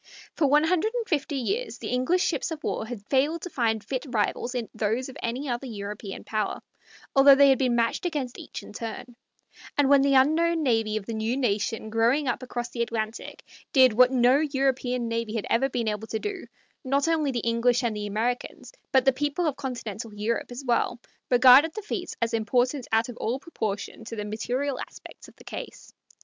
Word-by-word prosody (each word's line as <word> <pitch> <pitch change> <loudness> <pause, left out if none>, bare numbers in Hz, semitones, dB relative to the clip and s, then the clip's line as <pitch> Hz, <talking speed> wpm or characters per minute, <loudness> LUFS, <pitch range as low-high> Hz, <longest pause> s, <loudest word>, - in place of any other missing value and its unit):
For 300 - +2
one 295 +2 +4
hundred 365 +7 +1
and 470 -2 -2
fifty 290 -2 -1
years 405 - -2
the - - -6
English 255 +9 +1
ships - - -1
of 315 -2 -6
war 220 - -2
had 225 -4 -7
failed 290 +7 +1
to 360 - -6
find 225 -4 0
fit 255 +4 -3
rivals 240 +2 -1
in 235 -3 -2
those 225 +5 -1
of 265 - -10
any 250 +5 -3
other 245 +1 -3
European 205 -2 -6
power, 215 -2 -2 0.5
although 275 0 +8
they 280 0 +6
had 265 - +4
been 250 -3 +2
matched 230 -1 0
against 280 -7 -4
each - - -8
in - - -12
turn; 230 +2 -7 0.6
and 285 -2 +3
when 280 -1 +7
the 275 0 +3
unknown 320 +5 +3
navy 225 -5 +1
of 205 - -6
the 230 - -5
new 220 +3 -1
nation 220 -2 -1
growing 235 +6 +2
up 245 +1 -1
across 245 -1 -4
the 235 - -3
Atlantic 225 -1 -4 0.3
did 260 -4 +6
what 250 +3 +6
no 255 +1 +4
European 265 -4 0
navy 230 -1 -2
had 220 - -2
ever 265 +4 +3
been 240 -3 -2
able 215 +1 -2
to 220 - -2
do, 395 - -5 0.4
not 275 +2 +1
only 315 -3 +1
the 245 -3 -1
English 235 +2 +2
and 230 -3 0
Americans, 215 - -3 0.2
but 265 -1 +4
the 270 - +5
people 290 +5 -1
of 300 -4 0
Continental 235 -5 -5
Europe 225 +4 -2
as 250 +3 -7
well, 240 -1 +1 0.3
regarded 260 +6 +7
the 430 - -5
feat 370 -3 -4
as 230 - -1
important 245 +4 0
out 225 +1 +2
of 245 - -9
all 235 +4 -1
proportion 220 -8 -5
to 230 - -6
the 210 -1 -4
material 250 +6 -2
aspects - - -10
of - - -17
the - - -17
case. - - -9
250 Hz, 200 wpm, -26 LUFS, 225-280 Hz, 0.6 s, although